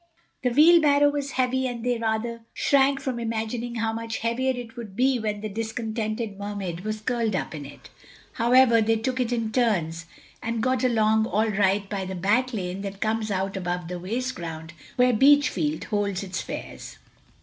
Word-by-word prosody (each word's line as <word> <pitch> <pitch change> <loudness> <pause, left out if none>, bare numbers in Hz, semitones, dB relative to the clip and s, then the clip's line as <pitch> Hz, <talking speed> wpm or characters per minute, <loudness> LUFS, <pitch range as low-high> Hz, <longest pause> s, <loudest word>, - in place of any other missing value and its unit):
The 250 - +1
wheelbarrow 290 0 +6
was 285 -1 -3
heavy 260 0 +1
and 240 -2 -5
they 245 -2 +1
rather 230 +1 -2
shrank 275 0 +3
from 260 -3 -3
imagining 230 +1 -3
how 225 -1 -1
much 225 0 -4
heavier 240 +3 0
it 245 -2 -7
would 220 -5 -8
be 255 +1 +2
when 210 -2 -3
the 215 - -3
discontented 220 -1 -3
Mermaid 200 -4 -4
was 215 +2 -4
curled 230 -2 0
up - - -3
in 145 -3 -6
it. 145 - -14 0.4
However, 235 0 +5
they 225 +1 +2
took 255 +4 -2
it 245 -1 0
in 230 -2 -1
turns, 170 -9 0 0.3
and 230 0 -2
got 255 0 +1
along 220 -2 +3
all 220 +1 +1
right 200 0 +1
by 195 -2 -3
the 190 0 -5
back 215 +8 +1
lane 190 -4 -4
that 195 -1 -6
comes 220 0 -1
out 195 0 -2
above 175 -2 -3
the 180 0 -4
waste 240 +8 -3
ground 165 -1 -7 0.2
where 250 0 +4
Beachfield 235 - +3
holds 200 -2 -1
its 185 -1 -4
fairs. - - -8
225 Hz, 180 wpm, -25 LUFS, 200-245 Hz, 0.4 s, wheelbarrow